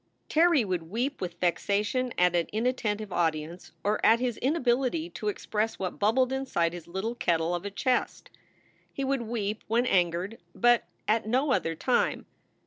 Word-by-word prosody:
Terry 320 -6 +4
would 175 -4 -3
weep 250 +8 -2
with 175 -2 -5
vexation 205 +8 0
at 180 0 +3
an 170 -1 +1
inattentive 215 -3 -1
audi 160 -3 +1
ence 170 +3 -11
or 210 +1 0
at 225 +1 +6
his 245 -3 -1
inability 270 +3 0
to 210 - -5
express 215 +2 -1
what 185 -2 -4
bubbled 250 +5 +2
inside 215 -11 0
his 175 -2 -8
little 190 +6 -3
kettle 170 -6 0
of 175 +2 -3
a - - -2
chest. 250 +5 -1 0.6
He 275 - -4
would 270 -1 0
weep 220 -2 -3
when 235 +3 +2
angered, 180 +1 +1 0.2
but 240 0 +4 0.2
at 220 0 +1
no 260 +5 +1
other 165 -10 0
time. 250 +9 0
215 Hz, 165 wpm, -28 LUFS, 180-250 Hz, 0.6 s, at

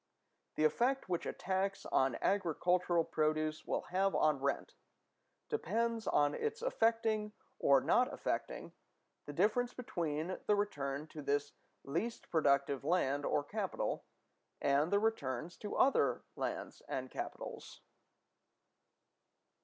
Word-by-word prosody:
The 155 - +1
effect 245 - +2
which 175 -2 -1
a - - 0
tax 195 +1 -1
on 130 -2 +2
agricultural 180 -2 +2
produce 155 0 0
will - - 0
have 195 +1 +2
on 150 -2 +3
rent 140 - -1 0.7
depends 230 - -1
on 145 0 +3
its 450 +1 -3
affecting 225 - +1 0.3
or 140 -1 +5
not 250 +1 +3
affecting - - -3 0.5
the - - -5
difference 245 +4 +2
between 170 -7 -2
the 210 - +5
return 145 -8 -2
to 155 - -8
this 145 0 0 0.3
least 175 +12 -3
productive 140 -4 +2
land 145 -3 +1
or 145 - +1
capital 200 +5 -2 0.6
and 140 +4 +2
the 200 - +5
returns 170 - -1
to 205 - -5
other 275 - +3
lands - - -4
and - - -3
capitals. - - -6
175 Hz, 120 wpm, -35 LUFS, 145-220 Hz, 0.7 s, or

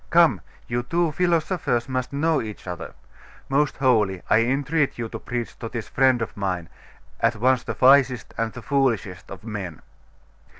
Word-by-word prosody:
Come, - - +5 0.3
you 120 +1 -1
two 165 +6 0
philosophers 165 -7 0
must 130 -1 -2
know 155 +2 +1
each 110 -2 -8
other. 90 -2 -6 0.5
Most 140 +1 +1
holy, 105 -9 +2
I 110 - +6
entreat 140 +5 +1
you 115 -1 -4
to 115 - -6
preach 120 0 -4
to 115 - -5
this 115 -2 -5
friend 130 -2 +3
of - - -7
mine, 90 -4 -3 0.5
at 115 +1 +2
once 125 +3 +2
the - - -5
wisest 130 -3 +4
and 115 -1 -1
the 120 - -10
foolishest 120 -10 0
of 100 - -9
men. 100 -7 -6
120 Hz, 165 wpm, -24 LUFS, 110-140 Hz, 0.5 s, I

